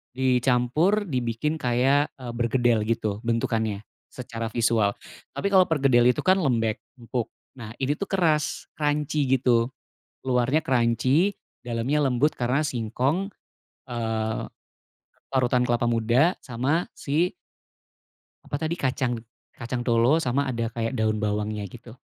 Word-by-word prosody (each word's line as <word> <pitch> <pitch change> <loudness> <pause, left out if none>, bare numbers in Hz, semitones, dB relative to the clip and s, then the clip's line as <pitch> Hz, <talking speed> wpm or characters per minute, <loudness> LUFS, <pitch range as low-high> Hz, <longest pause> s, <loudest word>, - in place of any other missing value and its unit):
dicampur 130 - +2
dibikin 130 - -2
kayak, 135 +4 +2
eee, 125 -3 -7
berkedel 120 -2 +1
gitu 110 -3 -1
bentukannya 110 -3 -1 0.2
secara 115 -3 -6
visual. 110 -3 +1 0.4
Tapi 200 - -1
kalau 185 -2 +6
perkedel 135 -6 +3 0.2
kan 185 +1 +4
lembek, 115 - 0 0.2
empuk. 120 -1 -3 0.3
Nah, 110 0 -8
ini 140 +3 -1
tuh 200 - -3
keras, 160 -6 0
crunchy 150 -1 0
gitu. 120 -2 +2 0.5
Luarnya 130 +4 +1
crunchy, 130 - +2 0.3
dalamnya 125 +5 0
lembut 135 +4 +1
karena 125 +4 +1
singkong, 140 - -1 0.6
eee, 110 -2 -2 0.9
parutan 125 -1 +2
kelapa 120 0 +1
muda, 120 - +2
sama 135 +7 -1
si 160 +6 0 1.1
apa - - -4
tadi 160 +2 -1
kacang, 130 -3 0 0.4
kacang 120 +1 -4
tolo, 120 +6 +3
sama 135 +2 0
ada 115 -3 -2
kayak 115 +2 -3
daun 110 -2 0
bawangnya 105 0 -2
gitu. 115 +4 -12
125 Hz, 120 wpm, -25 LUFS, 115-145 Hz, 1.1 s, kalau